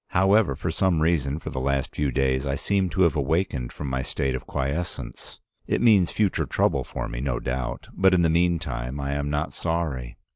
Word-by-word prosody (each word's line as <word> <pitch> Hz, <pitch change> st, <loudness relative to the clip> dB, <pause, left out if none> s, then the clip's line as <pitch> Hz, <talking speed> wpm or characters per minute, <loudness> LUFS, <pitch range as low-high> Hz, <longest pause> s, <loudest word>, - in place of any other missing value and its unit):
However, 95 Hz, -4 st, +3 dB
for 80 Hz, +4 st, -3 dB
some 90 Hz, 0 st, +2 dB
reason, 75 Hz, -4 st, +1 dB
for -, -, -7 dB
the 65 Hz, -, -3 dB
last 70 Hz, 0 st, -1 dB
few 70 Hz, -2 st, 0 dB
days, 65 Hz, 0 st, +1 dB
I 70 Hz, -, 0 dB
seem 95 Hz, +4 st, 0 dB
to 95 Hz, +3 st, +2 dB
have 85 Hz, -1 st, +3 dB
awakened 70 Hz, -3 st, 0 dB
from 75 Hz, -, -6 dB
my 65 Hz, 0 st, -1 dB
state 65 Hz, 0 st, -2 dB
of 65 Hz, -, -5 dB
quiescence. 70 Hz, +6 st, -4 dB, 0.3 s
It -, -, +1 dB
means 105 Hz, -7 st, +5 dB
future 105 Hz, -3 st, 0 dB
trouble -, -, +1 dB
for -, -, -5 dB
me, -, -, -5 dB
no 65 Hz, -3 st, -1 dB
doubt, 60 Hz, 0 st, -3 dB
but 95 Hz, -1 st, +4 dB
in 85 Hz, -, +3 dB
the -, -, +4 dB
meantime 80 Hz, -7 st, 0 dB
I 70 Hz, 0 st, -2 dB
am 70 Hz, 0 st, -1 dB
not 75 Hz, +1 st, -1 dB
sorry. 80 Hz, -8 st, -2 dB
75 Hz, 205 wpm, -25 LUFS, 65-85 Hz, 0.3 s, means